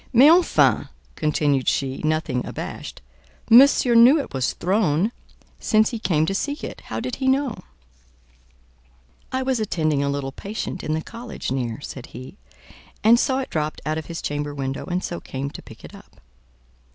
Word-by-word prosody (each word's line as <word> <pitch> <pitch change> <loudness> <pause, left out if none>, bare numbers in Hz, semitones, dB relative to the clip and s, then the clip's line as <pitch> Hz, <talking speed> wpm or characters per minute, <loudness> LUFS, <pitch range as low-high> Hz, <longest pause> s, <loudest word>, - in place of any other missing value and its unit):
"Mais 275 +4 +7
enfin," 350 +1 +3 0.3
continued 145 -3 0
she, 135 -1 0
nothing 155 -5 -1
abashed, - - -7 0.5
"monsieur 250 0 +7
knew 240 +6 +7
it 280 - -6
was 130 -2 -1
thrown, 185 0 +1 0.5
since 215 0 +2
he 230 - -4
came 160 -6 +1
to 195 - -2
seek 285 +9 -3
it—how 110 - -6
did 125 +2 -4
he 265 - -2
know?" 265 -2 +2 1.8
"I 260 0 -1
was 260 -2 0
attending 155 -8 0
a 140 - 0
little 140 -1 -3
patient 195 +4 -6
in 155 - -1
the 160 - -3
college 230 - -7
near," 125 0 -3
said 130 -3 -8
he, 130 +10 -11 0.6
"and 230 +2 +6
saw 265 +1 +1
it 260 - -7
dropped 155 -1 -2
out 155 +1 -1
of 160 - -9
his 165 -1 -6
chamber 145 0 -3
window, 135 -1 -4
and 180 0 -2
so 175 - -4
came 135 +1 -5
to - - -9
pick - - -14
it - - -12
up." - - -16
160 Hz, 170 wpm, -23 LUFS, 140-235 Hz, 1.8 s, Mais